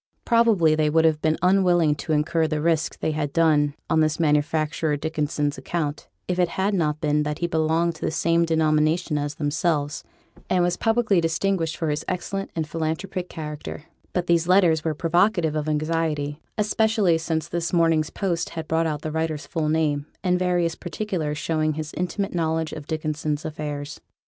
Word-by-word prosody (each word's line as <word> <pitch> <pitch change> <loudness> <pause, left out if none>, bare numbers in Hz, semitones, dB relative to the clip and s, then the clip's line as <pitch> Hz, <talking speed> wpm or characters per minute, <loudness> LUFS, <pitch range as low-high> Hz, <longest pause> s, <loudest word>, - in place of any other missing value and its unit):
Probably, 225 -9 +4
they 155 -1 +2
would 160 +1 +3
have 155 -1 +2
been 160 0 +1
unwilling 180 -4 +4
to 160 - -5
incur 155 +2 +2
the 155 -1 -1
risk 160 0 0
they - - 0
had 150 -2 -2
done 150 -3 +3
on 160 - +2
this 155 0 +1
manufacturer 155 0 +1
Dickinson's 150 -2 -2
account, 150 +1 -3 0.2
if 180 0 -1
it 180 - +4
had 195 +2 +1
not 155 -5 0
been 150 -1 +1
that 150 0 -2
he 175 - -1
belonged 165 +1 +1
to - - -20
the - - 0
same 170 +1 +2
denomination 160 0 +1
as 145 0 -3
themselves, 150 -1 -1 0.5
and 180 -1 +3
was 175 0 +1
publicly 225 -5 +2
distinguished 165 0 0
for 160 -2 -1
his 150 - -2
excellent 195 +2 -3
and 160 -2 -2
philanthropic 165 +4 -3
character; 150 -2 -7 0.3
but 180 -1 -1
these 170 -1 +2
letters 175 -4 +4
were 160 -2 -1
provocative 175 0 +2
of 155 0 -1
anxiety, 155 -1 -1 0.2
especially 210 -4 +2
since 160 -1 -2
this 170 0 -2
morning's 165 -3 +2
post 170 -4 -2
had 160 -1 -6
brought 165 0 +1
out 150 -1 -3
the 155 - -3
writer's 160 -1 -2
full 160 -3 -2
name, 150 -2 0 0.2
and 180 -1 +2
various 175 -2 +1
particulars 175 -5 -3
showing 155 0 0
his 155 0 -5
intimate 195 +3 -2
knowledge 160 -2 -1
of 150 -2 -8
Dickinson's 155 -1 -2
affairs. 150 -2 -5
160 Hz, 175 wpm, -24 LUFS, 150-175 Hz, 0.5 s, Probably